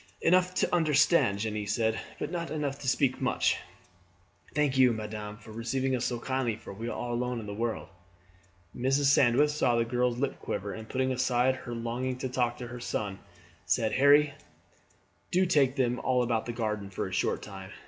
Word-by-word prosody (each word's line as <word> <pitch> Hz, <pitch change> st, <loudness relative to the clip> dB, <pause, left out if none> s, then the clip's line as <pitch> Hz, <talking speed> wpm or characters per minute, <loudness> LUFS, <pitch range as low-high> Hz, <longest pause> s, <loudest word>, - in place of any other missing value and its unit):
"Enough 180 Hz, +1 st, +3 dB
to -, -, +1 dB
understand," 155 Hz, -, +3 dB
Jeanne 105 Hz, 0 st, -3 dB
said; 110 Hz, +2 st, 0 dB, 0.2 s
"but 150 Hz, -, -4 dB
not 170 Hz, -3 st, -3 dB
enough 145 Hz, -2 st, -3 dB
to 135 Hz, -, -7 dB
speak 130 Hz, 0 st, +1 dB
much. -, -, +1 dB, 1.0 s
Thank 150 Hz, -3 st, +2 dB
you, 130 Hz, -2 st, +5 dB
madame, 105 Hz, -1 st, -6 dB
for 110 Hz, 0 st, -13 dB
receiving 130 Hz, +4 st, -1 dB
us 125 Hz, -, -1 dB
so 120 Hz, -, -1 dB
kindly, 130 Hz, -2 st, -1 dB
for 105 Hz, -2 st, -10 dB
we 115 Hz, +4 st, -5 dB
are -, -, -3 dB
all 120 Hz, 0 st, -3 dB
alone 125 Hz, 0 st, -1 dB
in 110 Hz, -, -7 dB
the 105 Hz, -, -5 dB
world." 115 Hz, +1 st, -3 dB, 0.9 s
Mrs. 135 Hz, +3 st, +3 dB
Sandwith 140 Hz, +4 st, +4 dB
saw 135 Hz, -5 st, +2 dB
the 115 Hz, 0 st, +2 dB
girl's 120 Hz, 0 st, 0 dB
lip 135 Hz, +2 st, -2 dB
quiver, 100 Hz, 0 st, -4 dB
and 110 Hz, 0 st, -9 dB
putting 130 Hz, 0 st, 0 dB
aside 125 Hz, 0 st, +2 dB
her 120 Hz, -2 st, -7 dB
longing 120 Hz, +2 st, -3 dB
to 130 Hz, 0 st, -3 dB
talk 120 Hz, -1 st, 0 dB
to 125 Hz, -, -6 dB
her 125 Hz, 0 st, -7 dB
son, 100 Hz, -4 st, -3 dB, 0.5 s
said: 110 Hz, +5 st, +2 dB
"Harry, 140 Hz, +3 st, +5 dB, 1.0 s
do 185 Hz, +1 st, +3 dB
take 140 Hz, -7 st, +3 dB
them 125 Hz, -3 st, +1 dB
all 125 Hz, -1 st, +1 dB
out 115 Hz, +1 st, -1 dB
in 120 Hz, -, -3 dB
the -, -, -13 dB
garden 105 Hz, -3 st, -2 dB
for 95 Hz, -, -3 dB
a -, -, -8 dB
short -, -, 0 dB
time. 95 Hz, -2 st, -9 dB
125 Hz, 195 wpm, -29 LUFS, 110-135 Hz, 1.0 s, you